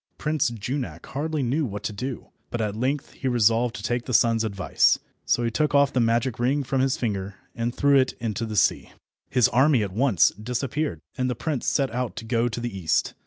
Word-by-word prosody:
Prince 150 -4 0
Junak 120 +4 -5
hardly 150 +1 -2
knew 135 +6 0
what 105 -5 -4
to 105 - -3
do, 125 +5 -5 0.2
but 120 - -4
at 105 -2 -1
length 130 +5 -2
he 135 - -5
resolved 115 0 +2
to 105 - -7
take 120 +1 -1
the 125 - -1
sun's 115 -1 +4
advice, 100 -4 +2 0.3
so 120 - +2
he 115 - 0
took 145 +6 +1
off 140 -1 +4
the 130 - +2
magic 115 +1 +1
ring 135 +4 +1
from 130 0 0
his 135 -1 +1
finger 100 -4 -3 0.2
and 115 +1 -2
threw 140 -1 +4
it 130 - +1
into 115 0 -3
the 110 - -5
sea. 100 - +1 0.4
His 125 -3 +4
army 130 -1 +4
at 95 -2 -5
once 115 -5 +3
disappeared, 125 - -2 0.2
and 130 0 +1
the 125 - -1
prince 145 0 -3
set 135 -5 +1
out 125 0 -2
to 115 - -7
go 115 +1 +1
to 120 0 -4
the 120 -4 -4
east. 80 -5 0
120 Hz, 215 wpm, -25 LUFS, 110-135 Hz, 0.4 s, sun's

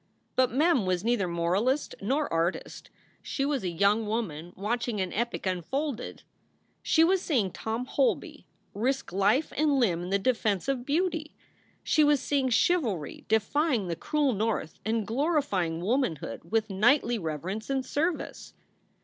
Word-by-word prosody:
But 255 -1 +3
Mem 270 - +2
was 180 -1 0
neither 230 -5 +1
moralist 185 - 0
nor 275 +9 0
artist; 165 +2 -2 0.3
she 275 - -2
was 280 -5 -1
a 180 - -1
young 200 +6 +2
woman 175 -7 -3
watching 225 +2 -2
an 185 -1 -2
epic 235 0 -2
unfolded. 245 - -3 0.6
She 320 - +4
was 370 +2 +3
seeing 230 - 0
Tom 225 +3 -3
Holby 270 +1 -1 0.3
risk 255 -1 -1
life 200 +10 +2
and 295 -2 +2
limb 180 -9 +2
in 175 - -5
the 200 - +2
defense 215 -2 0
of 260 -2 -2
beauty. 325 0 -1 0.5
She 310 - +3
was 295 -1 +4
seeing 270 -1 0
chivalry 230 - 0
defying 220 - +1
the 170 - -1
cruel 290 - 0
North 210 -6 -2
and 220 -1 0
glorifying 225 - 0
womanhood 180 - -1
with 220 -1 0
knightly 235 +4 +3
reverence 175 - -4
and 265 -1 0
service. 320 +5 -3
230 Hz, 145 wpm, -28 LUFS, 190-280 Hz, 0.6 s, She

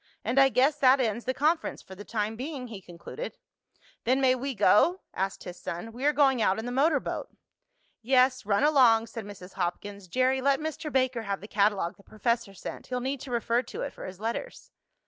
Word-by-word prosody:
And 240 +5 +2
I 270 0 +7
guess 270 +3 +3
that 265 0 +6
ends 230 -2 -1
the 260 - 0
conference, 315 +4 0
for 190 - -12
the 195 +2 -9
time 215 0 -2
being," 260 0 -6
he 210 -4 -8
concluded. 175 - -8 0.7
"Then 255 +3 +2
may 260 -1 +4
we 260 +1 -3
go?" 270 - +4
asked 195 +1 -3
his 180 0 -8
son. 175 +7 -6
"We 250 +4 -5
are 295 - +5
going 270 -4 +3
out 190 -2 +2
in 220 - -4
the 245 - -3
motor 280 +3 +3
boat." - - -5 0.7
"Yes, 255 +1 +3
run 200 +4 +1
along," 250 -7 +5
said 225 -2 -8
Mrs. 195 -2 -11
Hopkins. 195 +2 -4
"Jerry, 255 +6 +1
let 275 0 +2
Mr. 310 0 -4
Baker 255 -3 +1
have 200 -2 -3
the 205 - -10
catalogue 200 -4 +1
the 200 - -19
professor 215 -2 -2
sent. - - -8
He'll 250 -1 -2
need 265 +2 -3
to 275 - -8
refer 235 0 +1
to 245 - -8
it - - -5
for - - -8
his 185 0 -9
letters." 230 - -5
245 Hz, 210 wpm, -28 LUFS, 205-270 Hz, 0.7 s, I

